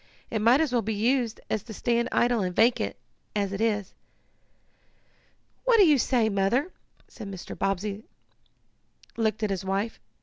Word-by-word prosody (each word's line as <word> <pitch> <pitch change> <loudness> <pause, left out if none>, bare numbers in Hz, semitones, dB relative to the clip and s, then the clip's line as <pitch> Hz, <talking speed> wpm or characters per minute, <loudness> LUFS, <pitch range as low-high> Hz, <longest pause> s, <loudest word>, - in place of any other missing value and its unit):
It 220 - -1
might 235 +5 +5
as 310 -5 0
well 240 - +3
be 220 0 -2
used 235 +1 0
as 220 - -1
to 220 0 -10
stand 235 +3 0
idle 240 -2 +2
and 180 -2 -2
vacant, 225 - +2 0.4
as 200 -1 -1
it 200 - -3
is." 210 -4 0 1.7
"What - - +4
do 405 - +7
you 300 -5 +5
say, 240 -3 +2
Mother?" 215 - +1 0.5
and 205 -3 -6
Mr. 185 -2 -8
Bobbsey 195 +2 -2 1.1
looked 220 -1 -1
at 210 - 0
his 190 -1 -2
wife. 195 +4 -2
220 Hz, 160 wpm, -27 LUFS, 200-240 Hz, 1.7 s, do